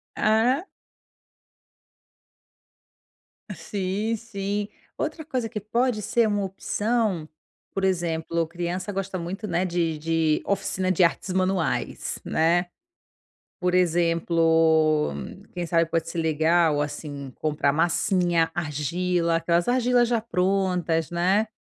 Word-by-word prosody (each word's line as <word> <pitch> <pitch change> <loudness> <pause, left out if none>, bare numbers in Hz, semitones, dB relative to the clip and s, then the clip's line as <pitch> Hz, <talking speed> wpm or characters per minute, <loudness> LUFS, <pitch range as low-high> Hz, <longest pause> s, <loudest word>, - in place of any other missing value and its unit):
Ah. 235 - +2 2.9
Sim, 205 +3 -2
sim. 205 -2 -4 0.3
Outra 315 0 -3
coisa 255 -6 -2
que 215 -1 -4
pode 230 +2 0
ser 230 +2 +2
uma 205 -1 0
opção, 205 -3 -1 0.5
por 195 - -2
exemplo, 170 -3 0
criança 175 +4 -4
gosta 195 -1 -3
muito, 185 +5 -5
né, 175 0 0
de 170 -3 -1
de 160 0 +1
oficina 190 -1 0
de 185 0 +3
artes 180 +2 +1
manuais, 185 -3 -1
né. 175 +2 +2 0.9
Por 180 0 0
exemplo, 165 - +3 0.4
quem 175 -1 -4
sabe 165 -1 +2
pode 165 -1 -1
ser 170 - -3
legal, 160 0 +2
assim, 145 -2 -5
comprar 150 -2 +1
massinha, 170 0 +2
argila, 170 +2 0
aquelas 170 +1 +1
argilas 245 -1 +3
já 235 -1 +1
prontas, 180 -5 0
né. 185 +5 +2
175 Hz, 110 wpm, -25 LUFS, 165-200 Hz, 2.9 s, de